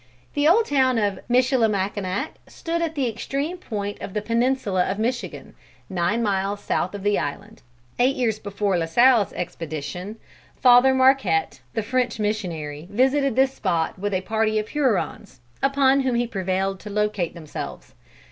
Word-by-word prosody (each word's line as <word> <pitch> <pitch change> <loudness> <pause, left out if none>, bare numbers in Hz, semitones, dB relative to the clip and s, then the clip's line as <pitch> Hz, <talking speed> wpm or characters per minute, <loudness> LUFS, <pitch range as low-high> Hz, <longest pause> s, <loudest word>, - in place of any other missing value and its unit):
"The 290 +1 +2
old 430 +8 +5
town 260 -3 +2
of 205 -3 0
Michilimackinac 220 -3 +1 0.2
stood 335 0 -3
at 325 -1 -2
the 270 -4 0
extreme 275 +9 -3
point 205 - -5
of 195 - -7
the 210 - 0
peninsula 230 -5 +1
of 195 - -2
Michigan, 215 - -3 0.4
nine 190 +6 0
miles 200 -1 0
south 185 +3 -1
of 200 - -7
the 205 0 +2
island. 210 +3 -6 0.4
Eight 260 +3 +3
years 225 -4 0
before 200 -2 -1
La 165 - -1
Salle's 235 +3 +4
expedition, 165 +4 -5 0.4
Father 255 +1 +6
Marquette, 260 - +3 0.2
the 225 - 0
French 250 +1 0
missionary, 170 -8 -3
visited 265 +4 +2
this 265 0 +3
spot 165 -3 -1
with 205 0 -1
a 185 - 0
party 220 +2 0
of 215 0 -2
Hurons, 215 - -1 0.2
upon 275 0 +3
whom 260 -2 0
he 240 +1 +1
prevailed 190 -2 -2
to 210 - -9
locate 210 -4 -1
themselves. 155 -3 -8
215 Hz, 155 wpm, -23 LUFS, 190-260 Hz, 0.4 s, Father